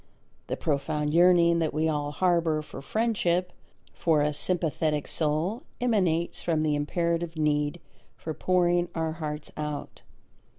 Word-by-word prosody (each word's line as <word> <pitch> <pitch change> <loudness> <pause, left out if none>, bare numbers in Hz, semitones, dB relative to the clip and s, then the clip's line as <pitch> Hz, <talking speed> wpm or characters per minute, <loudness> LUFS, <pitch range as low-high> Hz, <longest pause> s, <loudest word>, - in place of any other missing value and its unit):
The - - -3
profound 150 -1 -1
yearning 170 -1 +5
that 160 -2 -1
we 155 +1 +1
all 145 -2 -1
harbour 165 -1 +1
for 150 - -9
friendship, 180 -1 0 0.4
for 160 -3 +2
a 150 0 0
sympathetic 155 -1 0
soul, 160 - -1 0.2
emanates 185 -9 +1
from 160 -2 0
the 150 -1 +1
imperative 170 +2 -1
need 150 +1 0 0.4
for 160 - -5
pouring 175 0 +2
our 160 -1 -1
hearts 150 -2 -5
out. 150 -1 -5
160 Hz, 130 wpm, -27 LUFS, 150-175 Hz, 0.4 s, yearning